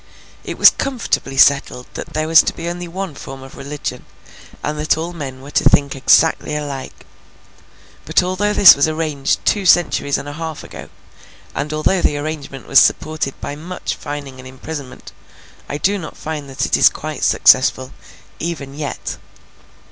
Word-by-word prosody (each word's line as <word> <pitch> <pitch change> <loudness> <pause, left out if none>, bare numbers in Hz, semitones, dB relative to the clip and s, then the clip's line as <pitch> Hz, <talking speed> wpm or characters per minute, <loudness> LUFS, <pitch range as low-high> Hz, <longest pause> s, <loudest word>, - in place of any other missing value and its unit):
It - - -6
was - - +8
comfortably 235 - -2
settled 135 -2 +3
that - - -8
there 155 0 -1
was 165 0 +7
to - - -3
be 165 - -6
only 175 0 -5
one 185 -1 -5
form 135 -1 -10
of 135 - -13
religion, 145 +1 -6 0.6
and 150 0 -3
that 155 +1 +1
all 170 +2 -4
men 135 -5 -7
were 140 - -10
to - - +1
think 140 -1 +3
exactly 150 +3 +3
alike. 140 -3 -6 1.0
But, - - +2
although 185 +3 -1
this 205 -2 +9
was 140 +2 +2
arranged 155 -3 -2
two 205 - +1
centuries 165 -5 +3
and - - -7
a 145 - -6
half 160 0 -6
ago, - - -10 0.6
and 145 +2 -3
although 155 +4 +1
the 145 - +1
arrangement 145 -3 -6
was 135 - +6
supported 155 -3 0
by 145 - -5
much 175 +4 -5
fining 140 -3 -7
and 130 - -10
imprisonment, 130 +1 -9 0.6
I 145 - -3
do 200 +6 0
not 160 - -9
find 150 -3 -6
that 135 - -2
it - - +1
is - - +6
quite - - -6
successful, 130 0 +4 0.5
even 155 -5 -5
yet. 145 0 -5
150 Hz, 170 wpm, -18 LUFS, 140-165 Hz, 1.0 s, this